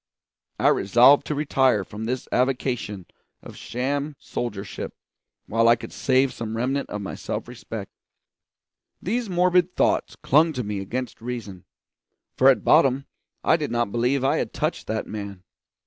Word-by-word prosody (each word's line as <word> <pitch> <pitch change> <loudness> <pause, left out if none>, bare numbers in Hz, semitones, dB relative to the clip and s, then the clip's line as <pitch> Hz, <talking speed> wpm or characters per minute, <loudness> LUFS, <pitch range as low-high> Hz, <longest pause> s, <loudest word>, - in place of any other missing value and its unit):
I - - +4
resolved 120 +8 +5
to 150 - -1
retire 135 -7 +2
from 105 +4 -7
this 125 +2 -3
avocation 125 -6 -1 0.4
of - - -11
sham 140 +4 -3
soldiership 100 -5 -5 0.5
while 115 +1 +2
I 120 - +7
could 115 - -9
save 130 0 +2
some 115 -1 -5
remnant 135 +4 -1
of 105 - -4
my 95 - -5
self - - -5
respect. - - -8 1.1
These 230 +3 -2
morbid 180 0 +2
thoughts - - +1
clung 155 +4 +3
to 125 -3 -3
me 105 -1 -3
against 120 +6 -5
reason; 115 -7 -6 0.7
for 130 - +6
at 135 - +3
bottom 140 -3 +4 0.4
I 160 - +4
did 150 -3 -3
not 120 -3 0
believe 125 +4 +1
I 135 - +2
had - - -3
touched - - -2
that 110 0 -2
man. 100 -3 -7
125 Hz, 150 wpm, -24 LUFS, 110-140 Hz, 1.1 s, I